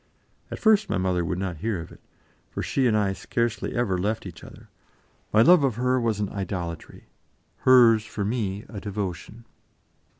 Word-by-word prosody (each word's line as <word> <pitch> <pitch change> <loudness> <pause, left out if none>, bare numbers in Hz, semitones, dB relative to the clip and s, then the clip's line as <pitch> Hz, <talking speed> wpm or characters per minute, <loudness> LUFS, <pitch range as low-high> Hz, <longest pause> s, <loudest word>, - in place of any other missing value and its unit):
At - - -6
first 215 -1 +3
my - - 0
mother 90 -1 0
would 85 +2 -2
not 90 -3 -3
hear 105 +2 -2
of 85 - -9
it, - - -16 0.5
for - - -5
she 130 -2 +1
and 110 -2 +2
I 100 -2 +1
scarcely 120 +3 -2
ever 105 -7 0
left 105 +4 -2
each 90 -3 -10
other; - - -13 0.6
my 110 +1 +5
love 180 +7 +7
for 135 -3 +1
her 125 0 +1
was 115 -3 0
an 105 -2 -1
idolatry, 90 -5 -6 0.5
hers 120 -4 +6
for 105 -2 -4
me 105 -2 -2
a 105 - -7
devotion. 105 +2 -5
105 Hz, 175 wpm, -25 LUFS, 95-120 Hz, 0.6 s, love